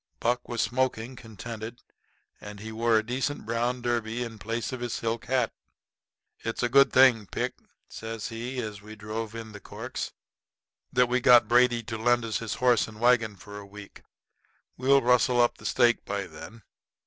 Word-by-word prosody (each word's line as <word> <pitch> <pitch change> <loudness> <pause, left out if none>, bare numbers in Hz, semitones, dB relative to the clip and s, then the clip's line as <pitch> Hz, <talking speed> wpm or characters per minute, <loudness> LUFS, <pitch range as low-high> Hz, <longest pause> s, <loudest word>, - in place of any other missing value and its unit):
Buck 120 +1 -1
was 120 -2 0
smoking, 125 +1 -1
contented, 115 0 -8 0.6
and 105 0 -9
he 110 +2 -7
wore 115 0 +2
a 110 - 0
decent 130 +3 -2
brown 120 +2 -1
derby 120 0 -1
in 115 -2 -8
place 115 +5 -3
of 130 - -4
his 120 -1 -3
silk 115 +1 -2
hat. 125 -2 +1 0.9
"It's 115 +2 -3
a 120 - +2
good 140 +2 +6
thing, 120 -6 +5
Pick," - - -2 0.3
says 110 0 -6
he, 120 +3 -5
as 105 -3 -6
he 105 +2 -11
drove 110 +1 -5
in 115 -1 -7
the 105 - -10
corks, - - -6 0.8
"that 125 - +4
we 125 +1 +1
got 120 -2 +6
Brady 120 0 +4
to 110 0 -5
lend 120 +1 +2
us 110 -4 -2
his 115 -2 -4
horse 125 -3 +3
and 110 -1 -12
wagon 115 -3 +3
for 105 +1 -10
a - - -9
week. 100 0 -12 0.7
We'll 135 +1 +3
rustle 125 0 +3
up 120 0 +3
the - - -5
stake 120 -1 +3
by 100 -1 -3
then. 95 +7 -11
115 Hz, 180 wpm, -27 LUFS, 110-125 Hz, 0.9 s, good